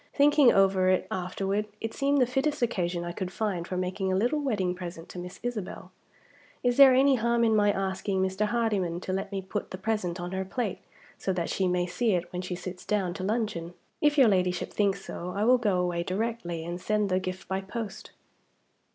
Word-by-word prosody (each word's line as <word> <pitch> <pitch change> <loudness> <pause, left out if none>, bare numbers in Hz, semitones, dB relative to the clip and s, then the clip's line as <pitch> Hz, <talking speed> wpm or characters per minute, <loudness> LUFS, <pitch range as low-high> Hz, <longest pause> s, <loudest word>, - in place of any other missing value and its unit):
"Thinking 290 -2 +6
over 190 -1 +4
it 185 0 +2
afterward, 195 +3 -2
it 225 0 -4
seemed 280 +1 +2
the 255 - +5
fittest 275 +3 0
occasion 175 -6 -1
I 175 - -4
could 185 +1 -4
find 190 -5 -2
for 185 - -3
making 185 +1 -1
a - - +2
little 240 +10 +1
wedding 205 -11 0
present 175 -2 -8
to 180 - -7
Miss 180 +1 -8
Isabel. 235 -6 -5 0.7
Is 245 -1 +2
there 270 -2 +9
any 270 0 +5
harm 235 +1 +2
in 220 -1 +4
my 205 -1 +4
asking 190 0 -1
Mr. 190 +2 0
Hardyman 210 -7 0
to 185 - -3
let 195 +1 -3
me 195 -1 -3
put 205 +2 -4
the 185 - -6
present 190 -3 -2
on 175 0 -5
her 190 0 -2
plate, 210 +1 -3 0.4
so 190 - -1
that 175 -2 -2
she 190 - +1
may 180 0 +1
see 215 +5 0
it 175 0 -2
when 180 - -2
she 180 0 -4
sits 180 0 -7
down 195 -4 0
to 185 - -6
luncheon? 200 -5 -2 0.3
If 295 0 +3
your 265 -4 +7
Ladyship 180 -3 +1
thinks 200 -2 0
so, 180 +1 -5
I 205 - +1
will 250 +2 +5
go 205 -6 +1
away 175 -1 0
directly, 185 -3 -3
and 175 +1 -5
send 210 0 +1
the 185 0 +2
gift 185 0 -6
by 190 0 -1
post." 210 +1 -6
195 Hz, 210 wpm, -28 LUFS, 180-225 Hz, 0.7 s, there